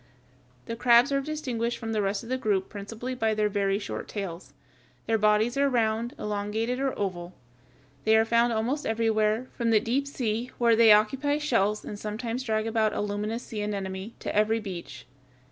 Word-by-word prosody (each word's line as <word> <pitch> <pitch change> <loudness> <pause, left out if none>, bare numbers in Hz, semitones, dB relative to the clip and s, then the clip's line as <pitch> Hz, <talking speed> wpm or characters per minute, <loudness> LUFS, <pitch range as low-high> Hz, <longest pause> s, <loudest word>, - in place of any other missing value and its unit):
The 230 - -4
crabs 240 +3 +5
are 275 0 +2
distinguished 255 -6 -3
from 225 -1 -5
the 215 -1 0
rest 200 +1 -1
of 230 - -10
the 255 - +1
group 205 -6 0
principally 225 +5 -6
by 225 -3 0
their 210 0 +1
very 195 -1 +1
short 205 - -5
tails. 190 -4 -6 0.5
Their 225 -1 +1
bodies 215 +4 +3
are 280 0 +3
round, 230 -1 0
elongated, 210 +4 -2
or 270 -1 -1
oval. 180 -3 -4 0.7
They 220 0 +4
are 220 - +4
found 235 +1 +3
almost 235 +7 -1
everywhere, 220 +1 +1
from 235 -2 0
the 220 -1 +5
deep 255 +6 -1
sea, 240 -3 -2
where 235 -1 +4
they 225 -1 +7
occupy 265 +8 +3
shells 215 -8 0
and 205 - -6
sometimes 225 +4 -4
drag 220 -3 -1
about 220 -1 +1
a - - -1
luminous 210 +3 -3
sea 215 -2 -5
anemone, 195 0 -4
to - - -4
every 215 +2 +3
beach. 190 -5 -8
220 Hz, 180 wpm, -27 LUFS, 210-240 Hz, 0.7 s, they